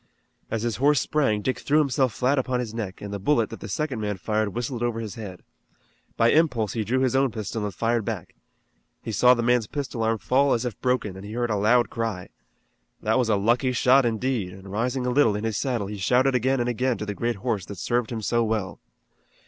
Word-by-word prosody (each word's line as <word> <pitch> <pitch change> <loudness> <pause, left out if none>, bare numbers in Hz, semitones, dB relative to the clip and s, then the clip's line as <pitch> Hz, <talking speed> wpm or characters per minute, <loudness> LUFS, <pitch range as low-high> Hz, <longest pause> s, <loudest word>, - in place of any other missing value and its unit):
As 115 -1 -2
his 115 -4 -1
horse 145 +2 +4
sprang 110 -9 0
Dick 130 - -1
threw 150 - +1
himself 135 -4 +2
flat 130 +5 +1
upon 130 -1 -1
his 115 -3 -4
neck, 105 -5 -5
and 100 0 -6
the 100 - -3
bullet 115 0 +1
that - - -7
the - - -7
second 130 +2 -2
man 105 -2 -2
fired 110 +1 -1
whistled 120 0 -3
over 120 -1 -1
his 110 -3 -5
head. 100 -5 -8 0.7
By 115 +1 +4
impulse 125 - +2
he 115 - -1
drew 130 +5 0
his 130 0 +1
own 135 0 +3
pistol 110 -1 -4
and 105 - -3
fired 115 +4 0
back. - - -5 0.7
He - - -4
saw 125 +3 +5
the 120 - -1
man's 120 -2 +2
pistol 135 -4 -4
arm 115 0 +1
fall 135 +5 +2
as 120 +1 -1
if 120 -5 -5
broken, 125 -6 0
and 95 - -9
he 105 +1 -8
heard 120 -1 -1
a - - +1
loud 115 +4 +3
cry. 110 -6 -3 0.7
That 110 +4 +2
was 120 -3 +1
a 110 - +4
lucky 120 +5 +2
shot 130 +2 +5
indeed, 115 -4 -1
and 95 0 -11
rising 125 +5 -1
a 125 - 0
little 125 -5 +3
in 105 - -3
his 110 -2 -1
saddle 120 -6 -1
he 105 +1 -6
shouted 125 +7 +2
again 130 +2 +1
and 120 - 0
again 125 +1 0
to 105 - -4
the 105 - -3
great 120 +3 -1
horse 100 -1 -3
that 100 - -8
served 120 +4 -1
him 110 -2 -4
so 120 +2 +1
well. 110 -4 -2
115 Hz, 235 wpm, -25 LUFS, 105-125 Hz, 0.7 s, saw